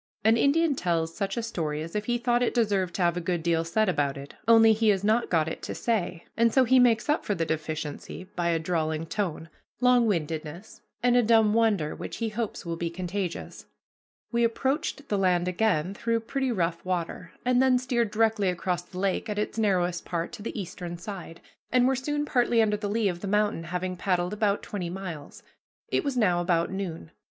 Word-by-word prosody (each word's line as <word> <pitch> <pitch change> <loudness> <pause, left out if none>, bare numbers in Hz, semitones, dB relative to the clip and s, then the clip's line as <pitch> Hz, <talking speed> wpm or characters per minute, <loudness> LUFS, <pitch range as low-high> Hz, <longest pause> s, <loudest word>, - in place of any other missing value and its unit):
An 220 +2 +5
Indian 295 +6 +3
tells 165 -7 -1
such 200 +3 -2
a 235 - -1
story 155 -9 -3
as 165 +4 -9
if 210 0 -1
he 240 +1 +1
thought 240 0 +1
it 245 - 0
deserved 200 -6 +1
to 185 - 0
have 170 -1 +2
a - - -1
good 175 -1 -2
deal 165 -1 +2
said 215 +6 +1
about 145 -6 0
it, 140 +1 -9
only 225 -1 +7
he 220 0 +2
has 195 -2 +2
not 220 +3 +2
got 160 -3 +2
it 160 - -5
to - - -5
say, 185 -7 -1
and 230 0 +3
so 260 +3 +5
he 255 +1 +5
makes 235 -2 +4
up 300 +1 +1
for 205 - -1
the 165 - -1
deficiency 155 +1 -4
by 175 -1 0
a 165 - +2
drawling 160 -1 -1
tone, 170 -3 -3 0.3
long 250 -1 +4
windedness, 165 0 -3 0.2
and 245 0 +4
a 245 - +6
dumb 225 -2 +4
wonder 210 -9 +2
which - - -7
he 230 -1 -1
hopes 215 -2 -4
will 170 0 -2
be 170 0 -2
contagious. 180 +1 -5 0.6
We 235 0 +2
approached 275 +4 -1
the 205 - 0
land 180 -2 +2
again 180 -2 +1
through 230 +2 -1
pretty 265 +3 -2
rough 170 -5 -1
water, 180 -1 -3
and 250 0 +3
then 260 -1 +4
steered 245 -3 0
directly 220 -2 +2
across 180 0 -1
the 180 +1 -12
lake 195 +3 -1
at 210 - -3
its 210 +2 -2
narrowest 180 -5 +1
part 170 -1 -3
to 235 - -9
the 215 - -5
eastern 175 -2 -6
side, 175 -3 -8 0.3
and 250 0 +4
were 265 - +2
soon 295 +3 -2
partly 245 -4 +2
under 215 -2 +3
the 205 -1 -3
lee 215 0 +1
of 175 -2 -2
the 200 - -5
mountain, 205 -4 +1
having 180 +2 -3
paddled 180 0 0
about 205 -1 0
twenty 180 -4 -4
miles. 170 -5 -7 0.5
It - - +1
was 280 -3 -2
now 180 -7 +3
about 170 -1 +1
noon. 180 - -5
195 Hz, 210 wpm, -27 LUFS, 170-230 Hz, 0.6 s, only